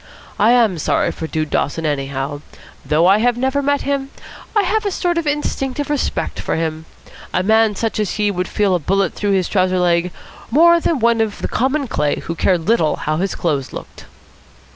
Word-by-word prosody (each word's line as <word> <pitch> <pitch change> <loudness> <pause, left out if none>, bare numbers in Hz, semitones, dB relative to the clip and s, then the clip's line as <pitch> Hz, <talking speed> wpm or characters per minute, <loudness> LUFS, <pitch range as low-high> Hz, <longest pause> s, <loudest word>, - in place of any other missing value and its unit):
I 225 +3 +5
am 220 -8 +3
sorry - - +1
for 160 - -6
Dude 155 -1 -3
Dawson, 160 +3 -1
anyhow. 140 0 -3 0.4
Though 150 +4 +2
I 195 +3 +5
have 240 +1 +2
never 265 +3 0
met 285 0 0
him, 275 -1 -2 0.5
I 415 - +4
have 430 +4 0
a 410 - 0
sort 350 -2 0
of 320 - -4
instinctive 290 -1 -2
respect 295 - -2
for - - -2
him. 160 -1 -3 0.5
A 180 - +2
man 220 +1 +3
such 225 +1 -2
as 210 -3 -1
he 210 -1 +1
would 180 -1 -2
feel 205 -2 +1
a 180 - +2
bullet 190 +3 0
through 205 -1 -1
his 185 -2 +1
trouser 185 -2 +1
leg 175 0 +1 0.4
more 340 +7 +5
than 330 -1 0
one 235 -1 +2
of 215 -2 -2
common 270 +3 0
clay 150 -9 0
who 165 - -4
cared 170 0 0
little 170 -9 +2
how 155 +1 -2
his 190 +2 -1
clothes 145 -6 -2
looked." - - -9
205 Hz, 195 wpm, -18 LUFS, 165-265 Hz, 0.5 s, I